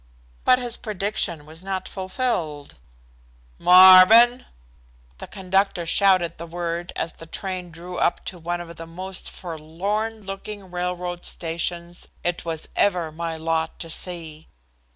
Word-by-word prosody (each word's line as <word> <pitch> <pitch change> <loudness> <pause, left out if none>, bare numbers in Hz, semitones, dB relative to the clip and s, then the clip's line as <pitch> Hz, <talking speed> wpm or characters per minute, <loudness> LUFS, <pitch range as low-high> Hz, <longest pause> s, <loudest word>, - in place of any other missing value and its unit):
But 255 - +6
his 245 -2 -2
prediction 195 -7 -1
was 160 +3 -11
not 190 -1 -3
fulfilled. 185 - -3 0.8
"Marvin!" 190 +7 +8 0.7
The - - -8
conductor 190 -2 0
shouted 185 -2 +2
the 170 - -7
word 170 +1 -4
as 165 - -3
the 165 - -12
train 185 0 -5
drew 175 +2 -8
up - - 0
to 180 - -6
one 175 +1 -3
of 170 -1 -10
the 165 - -8
most 185 +3 -5
forlorn 195 +7 -4
looking 195 0 -7
railroad 180 0 -3
stations 170 +1 -2 0.2
it 175 0 -1
was 165 -2 -3
ever 175 -5 +1
my 165 +1 -4
lot 160 0 -1
to 165 - -7
see. 160 -3 -3
175 Hz, 130 wpm, -23 LUFS, 165-190 Hz, 0.8 s, Marvin